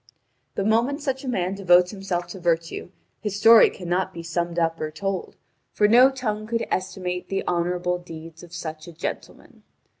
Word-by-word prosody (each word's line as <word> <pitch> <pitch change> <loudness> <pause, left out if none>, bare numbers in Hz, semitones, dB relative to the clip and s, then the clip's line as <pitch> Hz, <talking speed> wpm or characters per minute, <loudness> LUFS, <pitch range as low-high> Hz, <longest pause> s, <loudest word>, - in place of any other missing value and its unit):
The 195 - 0
moment 235 +7 +2
such 270 -3 -3
a - - -6
man 190 -6 -1
devotes 180 -2 +4
himself 190 -4 -3
to 190 - -8
virtue, 170 0 -1 0.3
his 210 -2 -3
story 225 +2 +8
cannot 180 0 -2
be 170 - -6
summed 170 +1 -2
up 165 -1 0
or 155 - -2
told, 190 +5 -4 0.4
for 210 - +4
no 245 +5 +7
tongue 215 -5 -3
could 230 0 -1
estimate 180 -1 -3
the 195 - -2
honourable 180 0 0
deeds 165 -1 -10
of 175 - -13
such 160 -2 -6
a 170 - -10
gentleman. - - -7
180 Hz, 175 wpm, -24 LUFS, 170-210 Hz, 0.4 s, story